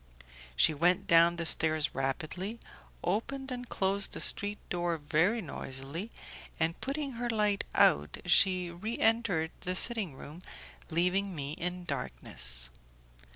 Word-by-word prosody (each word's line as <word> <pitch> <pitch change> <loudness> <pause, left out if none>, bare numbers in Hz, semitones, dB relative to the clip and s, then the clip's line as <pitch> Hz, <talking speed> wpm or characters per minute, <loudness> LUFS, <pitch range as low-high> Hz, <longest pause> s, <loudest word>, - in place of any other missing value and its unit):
She 155 - +4
went 175 +4 +1
down 170 +1 +5
the 170 -1 -4
stairs 155 -1 +3
rapidly, 160 - -4 0.4
opened 265 +8 -3
and 245 -1 -6
closed 195 +1 +2
the - - -2
street 205 +1 +5
door 175 -1 -2
very 160 +9 +1
noisily, 140 +6 -5 0.5
and 165 0 -1
putting 280 +1 -3
her 240 - -2
light 210 -3 0
out, 75 +1 +3
she 180 0 +3
reentered 215 -3 0
the 180 +1 -3
sitting 205 - +2
room, 150 +6 -11 0.5
leaving 180 +3 0
me 140 -1 -5
in 180 +2 -5
darkness. - - -3
175 Hz, 125 wpm, -30 LUFS, 155-205 Hz, 0.5 s, down